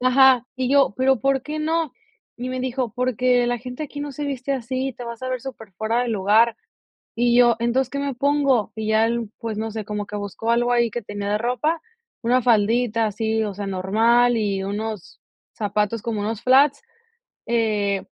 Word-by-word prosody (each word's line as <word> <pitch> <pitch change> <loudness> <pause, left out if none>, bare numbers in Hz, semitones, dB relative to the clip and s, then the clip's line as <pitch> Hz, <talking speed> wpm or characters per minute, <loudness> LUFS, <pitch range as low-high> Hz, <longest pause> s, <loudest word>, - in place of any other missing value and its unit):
Ajá. 255 -1 +5
Y 255 -1 -1
yo, 275 -6 +4
pero, 260 -2 +2
¿por 270 -1 +1
qué 300 +2 -5
no?, 320 -1 -1 0.4
y 250 +1 -5
me 255 0 -3
dijo: 255 -2 -2
"Porque 250 0 +2
la 245 0 0
gente 250 +4 -7
aquí 290 -1 -6
no 290 -1 -5
se 295 +2 -5
viste 275 -1 -3
así, 260 +1 -2
te 245 - -7
vas 235 -1 -7
a 255 - -3
ver 255 -1 -2
superfuera 225 -2 -3
del 240 -2 -2
lugar". 215 +4 +3 0.6
Y 240 0 +2
yo: 240 -1 +6
"Entonces, 240 +2 +1
¿qué 280 - -4
me 280 -1 -2
pongo?, 275 -3 +1
y 220 -1 -4
ya 220 +1 +3
él, 230 -2 -2
pues, 225 -3 -4
no 220 +1 -3
sé, 220 0 -5
como 210 0 -4
que 210 - -6
buscó 205 +3 -3
algo 240 +1 +2
ahí 235 -1 +2
que 240 +3 -4
tenía 205 0 -5
de 210 - +1
ropa, 250 +8 0 0.4
una 250 +1 +2
faldita 230 0 +2
así, 220 +1 -1
o 205 -2 -4
sea, 200 0 -5
normal 225 +6 +3
y 200 -3 -1
unos 210 -1 -5 0.3
zapatos 210 +1 -1
como 230 -3 -3
unos 215 +1 -3
flats, 270 +2 +4 0.6
eh, 210 -4 0
235 Hz, 195 wpm, -22 LUFS, 215-255 Hz, 0.6 s, yo